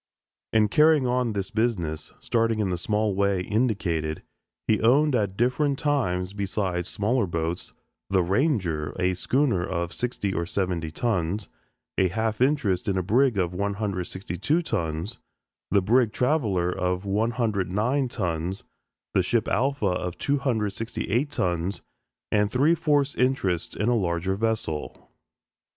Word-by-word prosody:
In 110 -1 +4
carrying 150 +3 +4
on 125 -2 +1
this 100 -2 -3
business, 90 -10 -1
starting 115 -1 +1
in 100 -4 0
the - - 0
small 105 +2 0
way 100 -1 +1
indicated, 90 -8 -1 0.4
he 110 - +2
owned 140 +6 +4
at 100 -5 0
different 135 +4 +1
times 100 - 0
besides 95 -3 -2
smaller 110 +1 0
boats, 85 +1 -3 0.4
"The 95 -2 +3
Ranger," 90 - 0
a 90 0 +2
schooner 120 -2 +1
of 85 -2 -3
sixty 115 -5 -2
or 85 -1 -2
seventy 90 -4 -1
tons, 95 +1 -1 0.5
a 95 - +4
half 110 +4 -2
interest 125 -9 +2
in 95 -2 +1
a 95 - 0
brig 120 +4 +3
of 90 -2 0
162 100 - -2
tons, 85 - -3 0.5
the 100 -1 +3
brig 115 +2 +3
"Traveller," 110 - +1
of 90 +1 -1
109 110 +3 0
tons, 90 -2 -3 0.5
the - - +4
ship - - 0
"Alpha," 135 -1 +1
of 90 -2 -1
268 115 -1 -1
tons 90 -5 -2 0.5
and 105 -1 +3
three 140 +9 +3
fourths 145 -4 +2
interest 100 -10 0
in 105 - -1
a 120 - +3
larger 90 -2 0
vessel. 110 -8 -3
100 Hz, 135 wpm, -26 LUFS, 90-120 Hz, 0.5 s, In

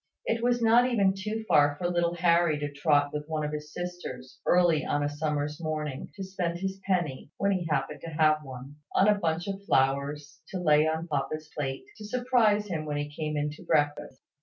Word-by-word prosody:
It 230 0 0
was 240 -1 +2
not 235 +2 +5
even 200 -6 +3
too 215 +3 -4
far 145 0 +4
for 175 - -1
little 175 -1 0
Harry 170 -2 +3
to 145 0 -3
trot 145 0 +2
with 150 0 -4
one 155 -1 -2
of 150 - -3
his 150 0 -6
sisters, 175 -8 -7
early 175 -3 +4
on 145 - 0
a - - +1
summer's 150 0 -2
morning, 155 -4 -3
to 195 - -5
spend 180 -3 -2
his 195 +1 -4
penny 170 -8 -1
(when 200 0 +1
he 180 -3 -1
happened 135 -3 -1
to 165 - -6
have 155 -1 +3
one) 135 +1 -9 0.2
on 195 - +5
a 210 - +6
bunch 165 0 -1
of 195 0 -4
flowers, 140 -1 0
to 190 - -5
lay 155 -2 +4
on 160 +2 -2
papa's 150 +1 -3
plate, 135 -3 -3
to 215 - -10
surprise 230 -3 +2
him 165 -6 -3
when 150 -1 -2
he 145 0 -4
came 155 -1 -2
in 150 0 -1
to 150 - -12
breakfast. 145 -2 0
155 Hz, 210 wpm, -28 LUFS, 145-185 Hz, 0.2 s, a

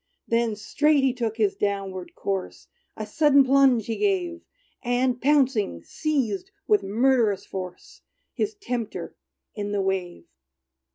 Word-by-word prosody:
Then 230 -1 +1
straight 290 +7 +2
he 265 -2 +3
took 230 -3 -3
his 210 -3 +1
downward 195 -3 -3
course; 195 -2 -4 0.3
A 215 - -4
sudden 280 +5 +4
plunge 265 -4 +4
he 225 - -3
gave; 360 -4 0 0.4
And, 245 0 0
pouncing, 255 - +2
seized, 310 - -2 0.2
with 420 -1 +4
murderous 225 -1 +2
force, 185 -2 -8 0.3
His 430 +1 -2
tempter 245 - -5 0.4
in 205 -1 -4
the 200 - +1
wave. 185 -2 -2
235 Hz, 125 wpm, -25 LUFS, 205-280 Hz, 0.4 s, sudden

